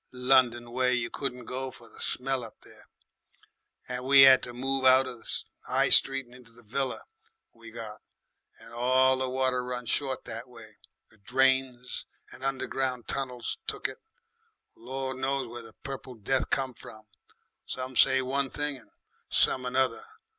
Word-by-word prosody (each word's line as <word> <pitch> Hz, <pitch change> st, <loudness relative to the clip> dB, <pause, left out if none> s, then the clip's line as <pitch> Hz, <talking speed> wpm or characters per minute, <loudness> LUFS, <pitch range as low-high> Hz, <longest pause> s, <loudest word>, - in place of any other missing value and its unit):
London 125 Hz, -2 st, +2 dB
way, 125 Hz, +1 st, +2 dB
you 115 Hz, -1 st, -2 dB
couldn't 125 Hz, -3 st, -4 dB
go 130 Hz, +2 st, -4 dB
for 120 Hz, -2 st, -14 dB
the -, -, -15 dB
smell 130 Hz, 0 st, -1 dB
of 115 Hz, -, -10 dB
there, -, -, -17 dB, 1.0 s
and 125 Hz, 0 st, -4 dB
we 135 Hz, +1 st, +8 dB
'ad 130 Hz, -1 st, +8 dB
to 120 Hz, -, -5 dB
move 135 Hz, +2 st, -1 dB
out 130 Hz, 0 st, +6 dB
of 125 Hz, -2 st, -7 dB
the -, -, -1 dB, 0.2 s
'I -, -, +2 dB
street 135 Hz, -1 st, +6 dB
into 120 Hz, -1 st, -16 dB
that 120 Hz, 0 st, -17 dB
villa 130 Hz, +4 st, -2 dB, 0.5 s
we 115 Hz, 0 st, -13 dB
got. 110 Hz, -2 st, -9 dB, 0.6 s
And 115 Hz, +1 st, -15 dB
all 130 Hz, +2 st, +3 dB
the 130 Hz, 0 st, -2 dB
water 130 Hz, -1 st, 0 dB
run 125 Hz, 0 st, -5 dB
short 135 Hz, +2 st, +1 dB
that 115 Hz, +3 st, -7 dB
way. 110 Hz, -3 st, -15 dB, 0.3 s
The 110 Hz, -, -24 dB
drains 130 Hz, +1 st, 0 dB, 0.2 s
and 130 Hz, -, -12 dB
underground 130 Hz, -2 st, -2 dB
tunnels 125 Hz, -3 st, -3 dB
took -, -, -1 dB
it. -, -, -10 dB, 0.8 s
Gor' 130 Hz, +2 st, -5 dB
knows 135 Hz, +1 st, -1 dB
where 120 Hz, 0 st, -8 dB
the 115 Hz, -1 st, -13 dB
Purple 135 Hz, -2 st, -7 dB
Death 125 Hz, +5 st, -1 dB
come 135 Hz, -1 st, 0 dB
from; 110 Hz, -1 st, -13 dB, 0.6 s
some 130 Hz, 0 st, -5 dB
say 130 Hz, +1 st, +5 dB
one 135 Hz, +1 st, 0 dB
thing 145 Hz, 0 st, -2 dB
and 110 Hz, -5 st, -18 dB, 0.4 s
some 130 Hz, -1 st, +2 dB
another. 130 Hz, -, 0 dB
130 Hz, 160 wpm, -28 LUFS, 120-130 Hz, 1.0 s, we